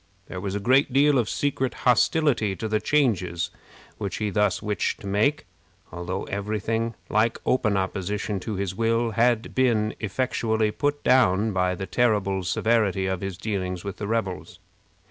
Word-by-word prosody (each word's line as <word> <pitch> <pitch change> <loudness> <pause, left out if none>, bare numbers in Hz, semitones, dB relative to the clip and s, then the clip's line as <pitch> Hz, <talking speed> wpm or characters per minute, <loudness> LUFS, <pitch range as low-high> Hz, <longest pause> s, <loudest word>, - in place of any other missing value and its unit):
There 90 - -7
was 100 0 -3
a - - -1
great 130 +6 +3
deal 140 +1 +4
of 115 - 0
secret 135 -3 -1
hostility 125 -4 +3
to 110 - -4
the 110 0 +1
changes 100 - 0 0.5
which 100 -3 -3
he 105 -1 -2
thus 105 -2 +1
wished 105 -1 -2
to - - -10
make, 105 +10 +1 0.5
although 85 +3 -4
every 105 +2 -3
thing 115 +2 -2
like 110 +2 +1
open 110 -5 +2
opposition 100 +1 -2
to 105 +3 -4
his 95 -1 -2
will 115 +2 +1
had 115 +1 +1
been 115 -5 +2
effectually 110 -1 0
put 145 +4 -1
down 110 -4 +3
by 90 -1 +1
the 95 - -5
terrible 100 -5 +1
severity 105 0 +1
of 95 -1 -2
his 95 -2 -4
dealings 95 -3 -3
with 100 - -6
the 105 - -4
rebels. 110 -5 -3
105 Hz, 165 wpm, -25 LUFS, 95-115 Hz, 0.5 s, deal